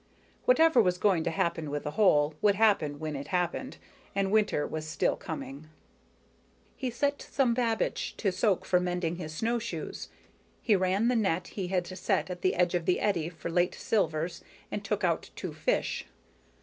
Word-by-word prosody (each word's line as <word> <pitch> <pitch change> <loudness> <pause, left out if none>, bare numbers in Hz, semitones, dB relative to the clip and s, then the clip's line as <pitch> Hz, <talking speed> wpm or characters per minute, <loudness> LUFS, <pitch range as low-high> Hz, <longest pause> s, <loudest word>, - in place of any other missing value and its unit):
Whatever 325 - +6
was 180 -3 +1
going 180 -4 +2
to - - +2
happen 165 -1 -1
with 145 0 -3
the 150 - -3
hole 150 -6 +4
would 205 -1 +4
happen 195 -9 +3
when 155 0 -4
it 140 +1 -5
happened, 180 +8 -2 0.4
and 195 -1 +1
winter 210 -8 +2
was 155 0 -5
still 155 - +1
coming. 155 -1 -7 1.1
He 260 - -3
set 280 +4 -1
some 260 -4 +1
babiche 230 -2 -1
to 200 - +1
soak 190 +1 +1
for 180 - +3
mending 180 -1 -1
his 160 -3 -6
snowshoes. 230 +7 -3 0.5
He 215 - +4
ran 190 +4 +2
the 250 - +2
net 185 -5 0
he 190 -3 -4
had 180 -1 0
set 185 +1 -1
at 180 - -6
the 185 - +2
edge 175 0 +2
of 175 -2 -1
the 180 - +3
eddy 170 -6 0
for 170 0 -6
late 175 +1 +2
silvers 165 -5 -1 0.3
and - - -3
took - - -2
out - - 0
two - - -5
fish. - - -1
180 Hz, 175 wpm, -29 LUFS, 165-215 Hz, 1.1 s, Whatever